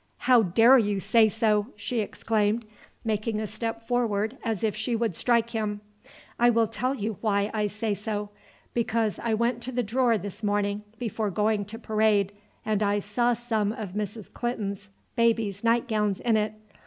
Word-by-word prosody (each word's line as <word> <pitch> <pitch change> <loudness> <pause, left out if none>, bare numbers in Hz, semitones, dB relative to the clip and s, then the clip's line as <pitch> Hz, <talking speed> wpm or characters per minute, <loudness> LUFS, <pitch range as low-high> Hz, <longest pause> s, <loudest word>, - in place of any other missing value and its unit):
"How 250 -2 +5
dare 225 +7 +6
you 205 -3 0
say 220 +2 +4
so!" 210 -1 +1
she 230 +3 -3
exclaimed 220 +1 0 0.4
making 215 0 -1
a 215 - -2
step 225 +1 -5
forward 225 -2 0
as 225 -4 -2
if 215 -3 +1
she 220 +2 -1
would 225 -3 0
strike 235 +5 +1
him. 210 -2 -2 0.6
"I 240 +1 +6
will 230 -1 +4
tell 235 +5 -2
you 215 -4 -3
why 205 -1 +1
I 210 -1 +1
say 210 +1 -2
so. 205 0 -4 0.4
Because 230 -2 0
I 230 -2 0
went 235 +2 0
to 255 - -4
the 245 0 0
drawer 235 +1 +2
this 205 -2 -7
morning 205 -1 0 0.2
before 220 -2 -2
going 210 +1 +1
to 220 +3 -8
parade, 215 -3 +2 0.3
and 215 -1 0
I 205 0 +2
saw 235 +4 +1
some 220 -3 -1
of 215 -5 -6
Mrs. 210 0 -5
Clinton's 205 -4 -3 0.3
baby's 225 -4 +1
night 230 +2 +2
gowns 210 -4 0
in 235 -2 +2
it. 215 0 +1
220 Hz, 175 wpm, -27 LUFS, 205-230 Hz, 0.6 s, dare